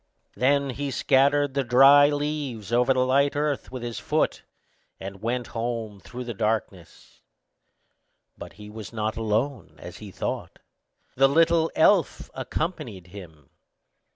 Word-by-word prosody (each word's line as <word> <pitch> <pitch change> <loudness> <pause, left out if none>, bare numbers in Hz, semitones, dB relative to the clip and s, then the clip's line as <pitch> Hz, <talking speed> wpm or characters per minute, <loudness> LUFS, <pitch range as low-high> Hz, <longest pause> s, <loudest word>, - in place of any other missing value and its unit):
Then 140 +1 +2
he 140 +3 -4
scattered 140 +2 +2
the 140 0 0
dry 135 +3 +7
leaves 145 -7 -3
over 125 +2 +3
the 130 -1 +2
light 140 +2 +2
earth 145 -1 -2
with 130 -2 -6
his 120 -2 -5
foot, - - -1 0.6
and 95 0 -8
went 120 +2 -2
home 115 -3 -4
through 125 +5 -8
the 120 -1 -5
darkness; 105 -5 -4 1.1
but - - -10
he 105 0 -12
went 110 +1 -9
not 110 0 -2
alone, 115 - -2
as 90 +4 -10
he 105 - -9
thought,—the 135 +6 -3
little 165 +2 +3
elf 175 0 +2
accompanied 125 - -4
him. 80 -8 -13
125 Hz, 130 wpm, -25 LUFS, 110-140 Hz, 1.1 s, dry